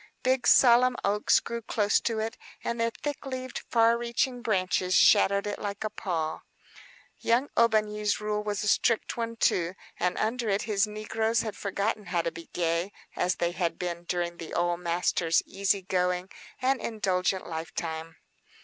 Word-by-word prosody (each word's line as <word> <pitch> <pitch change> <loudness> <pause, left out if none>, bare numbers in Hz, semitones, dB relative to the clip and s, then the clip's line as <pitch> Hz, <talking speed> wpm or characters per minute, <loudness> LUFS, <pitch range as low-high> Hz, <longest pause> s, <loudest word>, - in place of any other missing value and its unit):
Big, 260 0 +2
solemn 250 0 +6
oaks 205 +1 +3
grew 235 0 -5
close 210 -1 +1
to 230 -2 -2
it, 220 +1 -2 0.3
and 235 0 -2
their 230 - +2
thick 290 +5 -5
leaved, 255 -2 -5
far 230 0 +4
reaching 240 +1 -1
branches 185 -4 +1
shadowed 200 +1 +5
it 205 - -3
like 205 0 -4
a 215 - -2
pall. 165 -6 -3 0.8
Young 245 +5 +1
Aubigny's 215 -2 +2
rule 210 0 -1
was 210 -1 -2
a - - -2
strict 225 +2 +2
one, 230 -1 -3
too, 180 -5 +1 0.2
and 180 - 0
under 230 +1 -1
it 195 0 +1
his 215 -1 +1
negroes 220 +2 -1
had 215 -2 -5
forgotten 205 +1 -2
how 175 -2 0
to 170 - -1
be 165 +1 -11
gay, 170 +2 -1 0.2
as 180 +1 +1
they 170 0 0
had 170 -2 -2
been 175 -1 -4
during 175 -1 -2
the 165 - -7
old 175 0 +1
master's 170 -1 +1
easy 195 0 0
going 180 0 -1 0.3
and 260 0 +1
indulgent 190 -4 -1
lifetime. 160 0 -5
205 Hz, 165 wpm, -28 LUFS, 180-230 Hz, 0.8 s, solemn